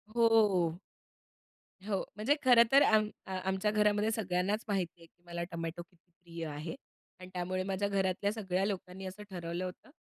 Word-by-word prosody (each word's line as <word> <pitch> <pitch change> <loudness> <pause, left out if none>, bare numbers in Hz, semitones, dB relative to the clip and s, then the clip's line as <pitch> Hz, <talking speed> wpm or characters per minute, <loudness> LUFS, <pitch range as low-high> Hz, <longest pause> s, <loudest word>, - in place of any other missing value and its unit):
हो. 210 -8 +4 1.1
हो, 195 -3 0
म्हणजे 220 +8 +2
खरंतर 245 +2 +7
आम 215 -3 +4 0.2
अ, 190 - -8
आमच्या 190 +2 0
घरामध्ये 210 +1 +2
सगळ्यांनाच 200 0 0
माहिती 185 -4 -2
आहे 165 - -13
की 175 +1 -30
मला 170 0 -4
टोमॅटो 165 0 -4
किती 175 0 -33
प्रिय 170 -1 -6
आहे. 155 +2 -5 0.4
आणि 185 0 -10
त्यामुळे 185 +1 -2
माझ्या 195 +1 -1
घरातल्या 195 0 0
सगळ्या 190 -3 -1
लोकांनी 190 -1 -4
असं 190 +3 -7
ठरवलं 175 0 -4
होतं, 180 - -9
190 Hz, 155 wpm, -32 LUFS, 175-210 Hz, 1.1 s, खरंतर